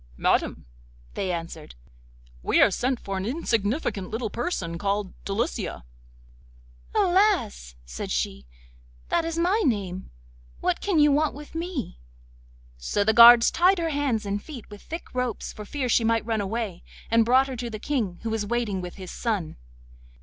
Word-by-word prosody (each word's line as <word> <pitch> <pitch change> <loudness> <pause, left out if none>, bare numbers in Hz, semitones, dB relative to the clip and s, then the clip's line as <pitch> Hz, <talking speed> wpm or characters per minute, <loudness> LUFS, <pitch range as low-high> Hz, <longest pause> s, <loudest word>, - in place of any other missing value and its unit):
'Madam,' - - +1 0.5
they 190 -2 -2
answered, 165 - -6 0.7
'we - - +2
are - - +6
sent 250 +5 -1
for 195 -1 -4
an 190 - -3
insignificant 230 - -1
little 225 -1 -3
person 180 - -3
called 200 -1 -1
Delicia.' 200 - -2 1.1
'Alas!' 365 - +2
said - - -6
she, 65 +1 -2 0.6
'that 335 - +1
is 330 0 -3
my 365 +6 +2
name. 195 - -1 0.5
What - - 0
can 395 -5 0
you 295 -1 +6
want 300 +1 +1
with 295 +1 -11
me?' 325 - -4 0.8
So - - 0
the 220 +2 +3
guards 235 +1 +9
tied 370 +3 +4
her 335 -1 -1
hands 280 -8 0
and 200 0 -2
feet 275 -8 -9
with 205 - -10
thick 330 +2 -8
ropes, 250 -3 -3
for 210 - -9
fear 265 +4 -3
she 235 -1 +3
might 225 -1 +1
run 220 -2 0
away, 200 -3 -3 0.3
and 230 0 +5
brought 255 +4 +4
her 265 - -5
to 240 0 -4
the 220 - -5
King, 215 -7 -2
who 225 - -2
was 220 -1 -1
waiting 210 -3 -1
with 180 -1 -7
his 185 -2 -8
son. 205 -9 -2
230 Hz, 165 wpm, -25 LUFS, 195-285 Hz, 1.1 s, guards